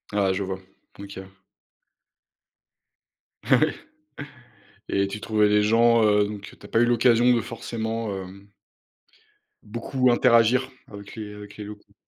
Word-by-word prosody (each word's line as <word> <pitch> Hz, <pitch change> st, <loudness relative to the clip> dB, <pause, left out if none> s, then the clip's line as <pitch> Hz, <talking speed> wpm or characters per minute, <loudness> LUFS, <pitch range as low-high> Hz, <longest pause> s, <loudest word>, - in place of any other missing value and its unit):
Ah, 100 Hz, -2 st, +2 dB
je 95 Hz, +1 st, -2 dB
vois. 95 Hz, 0 st, -5 dB, 0.4 s
OK. 100 Hz, -1 st, -9 dB, 2.2 s
Ah -, -, +4 dB
oui -, -, +2 dB, 1.2 s
et 100 Hz, 0 st, +1 dB
tu 100 Hz, +2 st, -7 dB
trouvais 105 Hz, -1 st, +2 dB
les 105 Hz, 0 st, +3 dB
gens, 115 Hz, +1 st, +4 dB
heu, 105 Hz, -1 st, +4 dB
donc, 105 Hz, -1 st, -6 dB
heu, -, -, -18 dB
tu -, -, -14 dB
as -, -, -9 dB
pas 115 Hz, -, +2 dB
eu 120 Hz, -, +5 dB
l'occasion 120 Hz, 0 st, +4 dB
de 120 Hz, -, +2 dB
forcément, 115 Hz, 0 st, -4 dB
hem 95 Hz, +2 st, -12 dB, 1.2 s
beaucoup 120 Hz, +3 st, 0 dB
interagir 120 Hz, +2 st, +3 dB, 0.2 s
avec 100 Hz, 0 st, -11 dB
les 105 Hz, -2 st, -7 dB
avec 105 Hz, 0 st, -11 dB
les 105 Hz, -, -8 dB
locaux. 105 Hz, 0 st, -12 dB
105 Hz, 145 wpm, -24 LUFS, 100-115 Hz, 2.2 s, eu